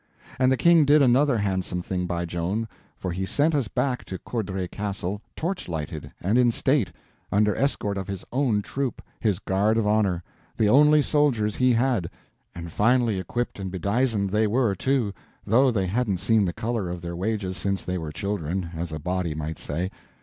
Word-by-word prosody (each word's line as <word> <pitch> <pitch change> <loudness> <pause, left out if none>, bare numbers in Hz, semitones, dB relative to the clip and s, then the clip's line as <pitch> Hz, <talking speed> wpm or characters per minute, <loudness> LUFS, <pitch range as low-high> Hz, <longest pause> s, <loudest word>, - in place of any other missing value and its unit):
And 130 0 +4
the 130 - +3
King 170 0 +6
did 145 +1 +5
another 130 +1 +4
handsome 95 -3 -1
thing 90 -1 -2
by 85 0 -2
Joan, 90 +7 -2 0.3
for 90 - -4
he 95 +2 -3
sent 145 +11 +2
us 140 -6 +1
back 125 +2 -1
to 95 - -5
Courdray 95 -6 -3
Castle 100 -1 -4
torch 180 +3 -3
lighted 80 -1 -5
and 105 +7 +2
in 125 -1 +5
state, 120 - +1 0.4
under 105 0 +3
escort 105 -7 0
of 95 - -5
his 100 -2 -5
own 120 -6 +1
troop—his 120 -6 -2
guard 105 +3 +1
of 115 - +1
honor—the 105 0 -1
only 150 +5 +6
soldiers 125 -10 +1
he 130 -1 +4
had; 115 -7 +1 0.5
and 85 -1 -7
finely 115 -1 +2
equipped 120 +5 -3
and 95 -1 -4
bedizened 100 +2 0
they 105 +1 +2
were, 115 -1 +2
too, 120 0 0 0.3
though 130 +6 +4
they 100 -6 0
hadn't 100 0 0
seen 105 +3 +2
the 90 - 0
color 110 -4 -2
of 85 -1 -6
their 85 0 -4
wages 95 0 -2
since 100 0 -2
they 90 0 -2
were 80 -2 -5
children, 90 -1 -3
as 85 0 -4
a 80 - -3
body 90 0 -2
might 80 +1 -4
say. 90 +6 -3
105 Hz, 180 wpm, -25 LUFS, 90-125 Hz, 0.5 s, King